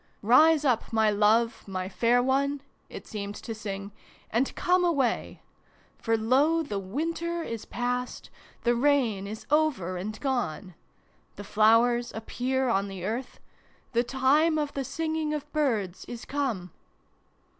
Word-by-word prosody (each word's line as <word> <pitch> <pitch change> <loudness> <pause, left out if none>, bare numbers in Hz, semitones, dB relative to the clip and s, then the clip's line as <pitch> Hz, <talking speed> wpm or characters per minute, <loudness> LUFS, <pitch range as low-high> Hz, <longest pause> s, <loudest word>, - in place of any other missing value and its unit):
" - - -40
Rise 300 +7 +5
up, 245 -5 +1
my 220 -1 +3
love, 220 +3 +2
my 185 -1 -3
fair 235 +5 +2
one" 280 +2 +1 0.3
it - - -9
seemed 205 -2 -6
to 225 - -6
sing, 200 -2 -6 0.2
" - - -28
and 245 +4 +1
come 360 0 +2
away! 285 -9 0 0.6
For 225 0 +1
lo, 280 +9 +3
the 205 -9 -3
winter 330 - -3
is 230 -6 -5
past, 245 +1 -3 0.3
the 240 - +3
rain 240 -6 +1
is 215 +1 -7
over 280 - +1
and 215 +4 -5
gone; 240 - -2 0.6
the 205 - -8
flowers 230 +4 +3
appear 255 +4 -1
on 200 -4 +1
the 190 -2 -6
earth; 235 +5 -4 0.5
the 235 0 +3
time 280 +6 +2
of 295 -1 -2
the 275 - -2
singing 315 +2 -2
of 295 0 -7
birds 225 - 0
is 235 -2 -8
come 240 - -2
245 Hz, 145 wpm, -27 LUFS, 215-285 Hz, 0.6 s, Rise